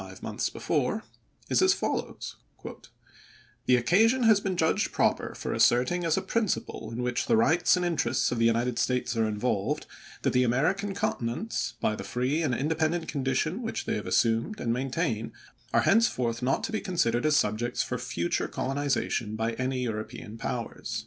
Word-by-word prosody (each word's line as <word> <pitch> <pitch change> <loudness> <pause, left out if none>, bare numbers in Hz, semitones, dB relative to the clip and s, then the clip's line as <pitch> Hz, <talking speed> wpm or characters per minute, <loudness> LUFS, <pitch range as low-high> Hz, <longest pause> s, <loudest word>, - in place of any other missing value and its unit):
ve - - -8
ls^.7' - - -15
months - - -2
before, - - -1 0.4
is - - +2
as 375 +1 +5
follows: - - -3 1.3
"The 125 - +6
occasion 220 - +3
has 220 -3 +6
been 190 -3 -2
judged 160 -1 +1
proper - - 0
for - - -4
asserting 125 +9 +3
as 165 - +2
a - - -1
principle 220 - -2
in 120 +2 -3
which 125 0 -1
the - - +4
rights 160 +12 +4
and 180 - 0
interests 170 -2 +1
of 120 - -1
the 115 - +3
United 115 +1 +1
States 125 -1 0
are 115 -1 +2
involved, 105 -1 -1 0.4
that - - +1
the 125 - +4
American 160 +12 +1
continents, 125 - -2
by 110 - 0
the 100 - -6
free 125 +9 -1
and 135 -7 +1
independent 160 +4 0
condition 140 - -1
which 225 -2 -4
they 225 - -1
have - - -3
assumed 115 - +1
and 115 - 0
maintain, 120 -3 -2 0.4
are - - +4
henceforth 125 - +2
not 130 +2 0
to - - -2
be 220 - -1
considered 170 - 0
as 155 - +3
subjects 115 -2 +1
for - - -4
future 85 0 -1
colonization 135 -5 -1
by 110 +1 -1
any 130 +1 -2
European 110 0 -5
powers." 115 -1 -4
130 Hz, 175 wpm, -28 LUFS, 115-175 Hz, 1.3 s, The